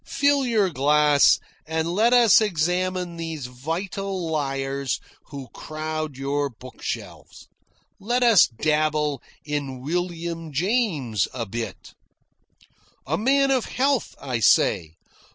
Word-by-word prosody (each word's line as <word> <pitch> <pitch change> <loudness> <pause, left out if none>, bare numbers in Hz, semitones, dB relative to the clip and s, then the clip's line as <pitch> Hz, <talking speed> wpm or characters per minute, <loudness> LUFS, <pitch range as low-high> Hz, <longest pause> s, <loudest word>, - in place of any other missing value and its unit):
Fill 285 -2 +2
your 210 -6 +2
glass 150 0 +4 0.3
and 160 +1 -1
let 220 +5 +3
us 235 -4 +6
examine 180 -1 -1
these 165 -4 -5
vital 175 +7 -4
liars 135 -2 -2 0.3
who 140 -3 -9
crowd 155 -2 -5
your 140 +1 -1
bookshelves. 125 +1 -8 0.5
Let 240 +5 0
us 230 -5 +6
dabble 150 +2 0 0.2
in 145 -3 -3
William 170 +2 -3
James 155 - 0
a 120 -2 -3
bit." 115 +3 -6 1.1
"A 150 - -1
man 275 +7 +2
of 260 -3 +1
health," 270 0 0
I 130 -4 -3
say. 80 -5 +3
155 Hz, 110 wpm, -24 LUFS, 140-195 Hz, 1.1 s, us